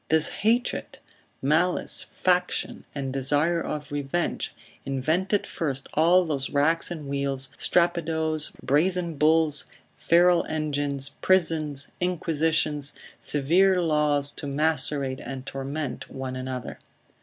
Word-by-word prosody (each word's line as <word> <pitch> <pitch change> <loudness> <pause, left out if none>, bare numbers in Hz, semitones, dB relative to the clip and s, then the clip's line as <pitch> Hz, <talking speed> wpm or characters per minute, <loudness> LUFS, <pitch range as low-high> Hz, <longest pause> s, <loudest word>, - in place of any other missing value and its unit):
This 160 0 +6
hatred, 235 +4 0 0.5
malice, 160 +6 +1
faction, 180 -1 0
and 135 -2 -3
desire 145 +5 +1
of 150 -2 -5
revenge, 145 +4 -2 0.3
invented 160 +10 0
first 135 -5 -3
all 175 +4 +4
those 140 -4 -2
racks 160 +4 +2
and 160 -5 -6
wheels, 140 -1 -2
strappadoes, 160 -3 +1
brazen 170 +4 +1
bulls, 155 0 +3 0.3
feral 175 +1 +4
engines, 145 -3 -2
prisons, 160 -6 +1
inquisitions, 160 -4 0 0.3
severe 180 +7 +3
laws 150 -3 +1
to 145 - -7
macerate 140 -2 0
and 135 -1 -7
torment 135 +1 -5
one 130 -1 -5
another. 130 -1 -5
150 Hz, 105 wpm, -26 LUFS, 140-170 Hz, 0.5 s, This